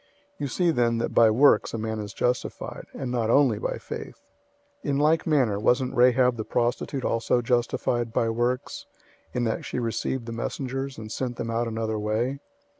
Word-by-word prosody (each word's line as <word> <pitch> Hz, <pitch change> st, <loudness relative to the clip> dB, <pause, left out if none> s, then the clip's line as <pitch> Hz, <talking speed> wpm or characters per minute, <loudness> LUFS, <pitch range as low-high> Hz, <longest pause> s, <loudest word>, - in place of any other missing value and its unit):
002:024 -, -, -35 dB, 0.3 s
You 145 Hz, -, -1 dB
see 175 Hz, +5 st, +1 dB
then 120 Hz, -5 st, +2 dB
that 115 Hz, -, -2 dB
by 115 Hz, -1 st, +6 dB
works, 125 Hz, +2 st, +4 dB
a -, -, -2 dB
man 110 Hz, 0 st, -3 dB
is 105 Hz, -1 st, -5 dB
justified, 125 Hz, +4 st, -3 dB
and 130 Hz, -2 st, -4 dB
not 115 Hz, -3 st, 0 dB
only 140 Hz, +3 st, +4 dB
by -, -, -2 dB
faith. -, -, -8 dB, 0.6 s
002:025 -, -, -3 dB
In 140 Hz, -, +1 dB
like 155 Hz, +4 st, +2 dB
manner 130 Hz, -10 st, +2 dB
wasn't 125 Hz, +4 st, +1 dB
Rahab 125 Hz, 0 st, +4 dB
the 110 Hz, -, -2 dB
prostitute 120 Hz, +4 st, -1 dB
also 120 Hz, +1 st, +1 dB
justified 120 Hz, -1 st, 0 dB
by 115 Hz, -, +1 dB
works, 120 Hz, +3 st, -2 dB, 0.4 s
in 125 Hz, -, -1 dB
that 115 Hz, -2 st, -1 dB
she -, -, -5 dB
received 120 Hz, +1 st, -2 dB
the 115 Hz, -, -6 dB
messengers, 135 Hz, +3 st, -4 dB
and 110 Hz, -1 st, -8 dB
sent 125 Hz, 0 st, -3 dB
them 115 Hz, -, -4 dB
out 115 Hz, +1 st, 0 dB
another 110 Hz, -1 st, -2 dB
way? 115 Hz, +6 st, -1 dB
120 Hz, 190 wpm, -26 LUFS, 115-130 Hz, 0.6 s, by